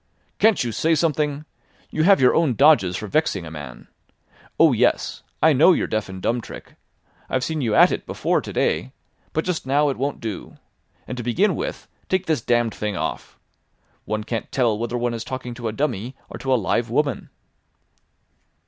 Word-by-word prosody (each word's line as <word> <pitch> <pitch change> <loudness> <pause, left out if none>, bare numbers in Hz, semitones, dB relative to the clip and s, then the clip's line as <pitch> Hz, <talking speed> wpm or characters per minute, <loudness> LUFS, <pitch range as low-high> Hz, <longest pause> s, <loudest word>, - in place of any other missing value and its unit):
"Can't 220 - +4
you 120 - -2
say 160 +9 +1
something? 150 -2 0 0.5
You 155 - -1
have 200 +1 +6
your 125 - +5
own 155 -8 +2
dodges 120 - +4
for 105 - -5
vexing 105 - 0
a 80 - -9
man. 75 -6 -9 0.7
Oh - - +6
yes! - - +1 0.2
I 160 0 +6
know 155 +7 +6
your - - 0
deaf 110 -2 -2
and 95 0 -7
dumb 120 +5 0
trick. - - -11 0.6
I've 130 -1 0
seen 160 +1 -2
you 115 -5 0
at - - +7
it - - -4
before - - 0
to - - -7
day. - - 0 0.4
But 160 - -1
just 180 -7 -2
now 145 +2 +3
it 135 - -3
won't 140 +2 -2
do. 110 -4 -6 0.5
And 125 - -5
to 120 - -4
begin 165 - +1
with, - - -5 0.2
take 185 0 +1
this 160 -7 0
damned 120 -1 +1
thing 105 -3 -3
off. - - -4 0.7
One 110 0 -2
can't 115 +1 -4
tell 120 -5 +2
whether 120 +3 -3
one 120 0 -1
is 115 - -4
talking 130 -2 -6
to 120 -1 -5
a - - -1
dummy 120 -1 -2 0.2
or - - -7
to 135 - -2
a - - +5
live 115 +2 0
woman." 140 +2 -1
125 Hz, 195 wpm, -22 LUFS, 110-150 Hz, 0.7 s, at